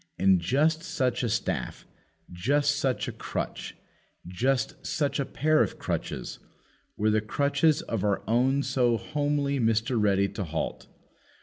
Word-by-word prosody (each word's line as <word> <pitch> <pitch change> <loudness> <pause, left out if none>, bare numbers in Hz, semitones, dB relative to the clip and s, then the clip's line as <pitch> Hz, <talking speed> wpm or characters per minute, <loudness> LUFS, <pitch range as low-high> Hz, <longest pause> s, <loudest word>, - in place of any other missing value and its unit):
And 95 -2 +4
just 155 - +2
such 130 -8 -1
a 120 - 0
staff, 110 - -2 0.5
just 145 +11 +1
such 135 -4 0
a - - -2
crutch, - - -5 0.5
just 125 +9 -1
such 145 -2 -1
a 140 - 0
pair 155 +4 +2
of - - 0
crutches, - - -4 0.6
were 110 +1 +2
the 110 0 +2
crutches 140 +7 +1
of 110 -4 -3
our 100 -2 0
own 130 +5 +2
so 125 -3 +2
homely 145 +3 -1
Mr. 115 +1 +1
Ready 100 -1 +3
to 100 - -4
halt. 80 -2 -4
125 Hz, 140 wpm, -27 LUFS, 105-140 Hz, 0.6 s, And